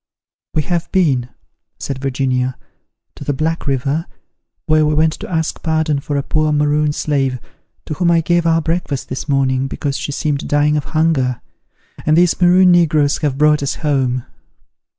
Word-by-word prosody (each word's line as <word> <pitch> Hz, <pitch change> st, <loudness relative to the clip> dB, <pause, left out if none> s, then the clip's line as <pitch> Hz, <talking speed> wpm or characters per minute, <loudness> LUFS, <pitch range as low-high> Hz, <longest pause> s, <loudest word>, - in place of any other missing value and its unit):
"We 155 Hz, -, +2 dB
have 170 Hz, +2 st, -2 dB
been," 140 Hz, -10 st, +1 dB, 0.5 s
said 135 Hz, -1 st, -5 dB
Virginia, 130 Hz, -1 st, -1 dB, 0.6 s
"to -, -, -10 dB
the 145 Hz, -, -1 dB
Black 160 Hz, +3 st, -2 dB
River, 140 Hz, +4 st, -1 dB, 0.6 s
where 155 Hz, -1 st, +3 dB
we 150 Hz, 0 st, +1 dB
went 155 Hz, +1 st, +3 dB
to -, -, -8 dB
ask 160 Hz, -3 st, -2 dB
pardon 160 Hz, -2 st, 0 dB
for 145 Hz, 0 st, -3 dB
a 140 Hz, -, -1 dB
poor 155 Hz, +1 st, 0 dB
Maroon 150 Hz, 0 st, +2 dB
slave, 135 Hz, -4 st, -1 dB, 0.5 s
to -, -, -4 dB
whom 175 Hz, +2 st, +1 dB
I 170 Hz, -1 st, +4 dB
gave 170 Hz, +1 st, +1 dB
our 165 Hz, -1 st, +2 dB
breakfast 165 Hz, -4 st, -2 dB
this 130 Hz, +4 st, -5 dB
morning, 135 Hz, -1 st, +1 dB
because 140 Hz, 0 st, -3 dB
she -, -, -4 dB
seemed 145 Hz, 0 st, -2 dB
dying 145 Hz, +1 st, +2 dB
of 150 Hz, -, -1 dB
hunger; 135 Hz, -7 st, +1 dB, 0.6 s
and 155 Hz, +1 st, +2 dB
these 175 Hz, +1 st, +3 dB
Maroon 180 Hz, +1 st, +6 dB
negroes 155 Hz, -4 st, +3 dB
have 145 Hz, -4 st, -1 dB
brought 150 Hz, 0 st, +3 dB
us 140 Hz, -, -2 dB
home." 130 Hz, -4 st, 0 dB
150 Hz, 170 wpm, -17 LUFS, 135-160 Hz, 0.6 s, Maroon